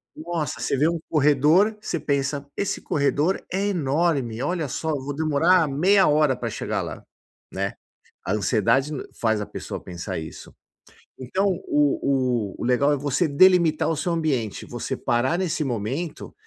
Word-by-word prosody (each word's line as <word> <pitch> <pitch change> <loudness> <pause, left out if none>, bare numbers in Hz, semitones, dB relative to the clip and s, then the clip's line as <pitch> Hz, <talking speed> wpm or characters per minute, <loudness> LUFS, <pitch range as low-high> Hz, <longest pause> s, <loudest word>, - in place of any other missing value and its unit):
Nossa, 170 - -4
você - - 0
vê 150 +4 +3
um 170 -1 -2
corredor, 155 +8 +3
você 170 - -3
pensa: 140 0 -1
“Esse 200 - -2
corredor 150 +5 0
é 195 +2 0
enorme, 145 - 0
olha 165 0 -1
só, 160 +4 -4
eu 145 -3 -1
vou 140 +1 -5
demorar 160 +3 +3
meia 190 +8 +4
hora 150 -2 +3
pra - - -4
chegar - - -3
lá.”, - - -6 0.5
né? 100 +1 -2 0.5
A - - -2
ansiedade 110 +7 +1 0.3
faz 110 -2 +1
a - - -3
pessoa - - -7
pensar 85 -1 -6
isso. 80 -1 -10 0.6
Então, 160 +10 -1 0.2
o 145 -1 +2 0.6
o - - -13
o - - -4
legal 135 +4 +3
é - - 0
você 145 +4 0
delimitar 165 +1 +4
o 165 - -1
seu 170 +3 -1
ambiente, 140 -10 -1
você - - -4
parar 125 +8 0
nesse 175 -4 -1
momento 130 +7 -4
150 Hz, 160 wpm, -24 LUFS, 130-170 Hz, 0.6 s, meia